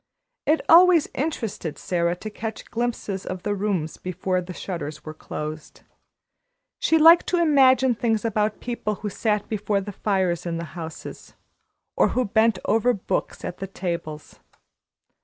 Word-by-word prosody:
It 310 +2 +3
always 345 -1 +7
interested 230 - -3
Sara 170 -1 0
to 215 +4 -8
catch 220 +1 -7
glimpses 230 -5 -2
of 185 -1 -6
the 205 - 0
rooms 190 -6 -2
before 185 0 -2
the 180 +1 -8
shutters 170 -5 -6
were 155 - -6
closed. 155 0 -7 1.0
She 320 - +3
liked 330 +2 +7
to 360 - +1
imagine 265 -5 +5
things 225 -1 0
about 215 -1 0
people 235 -3 -3
who 205 +1 -5
sat 210 0 -1
before 210 -1 -1
the 200 +1 -6
fires 190 -4 -1
in 165 -1 -2
the 170 - -4
houses, 165 -2 -8 0.6
or - - +4
who 255 - +2
bent 220 +1 +3
over 225 +3 +3
books 195 - -3
at 175 - -6
the 195 - -4
tables. 170 -5 -5
205 Hz, 150 wpm, -24 LUFS, 180-235 Hz, 1.0 s, always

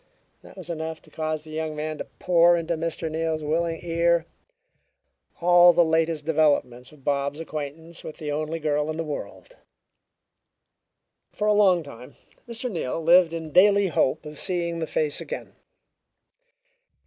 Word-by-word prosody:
That - - -16
was 185 - -9
enough 160 -1 -5
to - - -19
cause 155 -1 -3
the 155 - -12
young 155 0 -3
man 155 0 -4
to - - -4
pour 175 -1 +3
into 170 0 -2
Mr. 165 0 -3
Neal's 160 0 -2
willing 165 +2 -1
ear 170 0 +1 1.2
all 175 0 +7
the 170 - +4
latest 160 -1 0
developments 145 -6 +1
of 150 -3 -19
Bob's 140 +1 -1
acquaintance 160 +1 -6
with 155 - -8
the 150 -3 -5
only 155 +2 -2
girl 150 -1 -1
in 155 - -3
the 165 - -2
world. 160 - -8 1.7
For 210 - -3
a 210 - +4
long 190 -5 +4
time 130 -1 -12 0.3
Mr. 235 +1 -4
Neal 165 - -3
lived 170 +1 +5
in 165 -2 -6
daily 200 +3 +5
hope 155 0 0
of 150 -1 -8
seeing 170 -3 -2
the 160 - -3
face 150 -2 -1
again. - - -7
160 Hz, 155 wpm, -25 LUFS, 155-170 Hz, 1.7 s, all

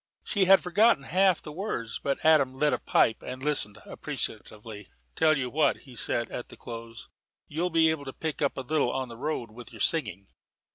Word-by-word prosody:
She 200 -4 +1
had 195 +1 +6
forgotten 200 -2 +3
half 185 +3 +2
the 150 - -8
words, 150 - -4
but 140 +1 -2
Adam 140 -5 +4
lit 150 +1 +2
a - - 0
pipe 110 - +2
and 130 +1 -7
listened 135 -9 +3
appreciatively. 105 -2 -5 0.3
"Tell 155 -1 +3
you 130 -2 -2
what," 155 +1 +1
he 130 -3 -14
said 115 +1 -1
at 120 - -6
the - - -13
close; 115 -1 -9 0.4
"you'll 170 +4 -2
be 160 -1 +4
able 150 -3 -4
to 135 - -5
pick 160 -2 -4
up 140 - 0
a - - -2
little 140 -1 0
on 130 -1 -3
the 115 - -9
road 130 -4 -3
with 120 +1 -12
your - - -12
singing. 105 - -1
140 Hz, 200 wpm, -27 LUFS, 120-160 Hz, 0.4 s, had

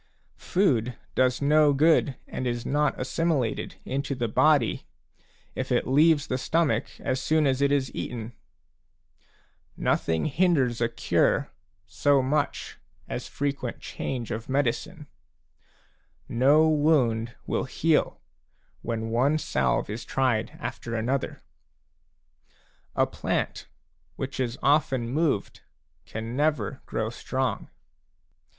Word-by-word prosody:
Food 125 - +1 0.2
does 130 +1 +2
no 150 0 +5
good 145 -1 +3
and 130 - -4
is 120 -1 -2
not 145 0 +1
assimilated 135 -2 -1
into 140 +1 -2
the 120 -2 -1
body 110 - +2 0.7
if - - -4
it - - +2
leaves 145 +2 +4
the 130 - -2
stomach 165 +4 0
as 130 +1 -1
soon 155 +2 +2
as 135 -1 +1
it 140 0 +3
is 140 -2 0
eaten; 115 -1 -5 1.4
nothing 80 -1 0
hinders 145 -7 +2
a 115 - +2
cure 115 - +1 0.3
so 130 +7 +2
much 145 +2 -1 0.3
as - - -5
frequent 140 -4 -3
change 125 -4 -5
of 110 +2 -5
medicine; 145 +5 -1 1.2
no 145 +6 +4
wound 130 -7 +2
will - - -1
heal 155 +3 +1 0.6
when 115 -1 -3
one 135 +6 +3
salve - - 0
is 110 +3 -5
tried 120 -2 0
after 120 -1 -5
another; 125 +4 -2 1.5
a - - +4
plant - - -3 0.5
which - - -5
is 125 -1 -1
often 135 -4 +2
moved 145 -5 -1 0.5
can 115 +2 -5
never 145 -7 0
grow - - -2
strong. - - -3
130 Hz, 115 wpm, -26 LUFS, 120-150 Hz, 1.5 s, no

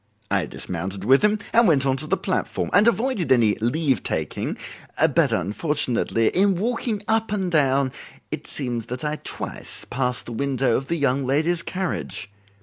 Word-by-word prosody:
I - - +1
dismounted 95 +2 -4
with 130 +6 +5
him 210 0 +3 0.2
and 235 -1 +6
went 140 -5 +3
on 135 -1 +2
to 155 - -2
the 190 - +1
platform, 185 - -2
and 205 +4 +6
avoided 235 - +1
any 115 -5 +5
leave 130 - +1
taking; - - -3 0.4
but - - +3
unfortunately 120 - +1
in 195 +1 +3
walking 220 +1 -2
up 220 -1 +1
and 190 -4 -1
down 135 -4 +3 0.4
it 155 0 -5
seems 120 -5 -3
that 125 +3 -5
I 150 0 -1
twice - - -4
passed 125 0 -2
the - - -8
window 130 -1 0
of 135 - -2
the 170 - 0
young 140 -2 +1
lady's 155 +6 +1
carriage. 170 - -4
140 Hz, 165 wpm, -23 LUFS, 125-185 Hz, 0.4 s, and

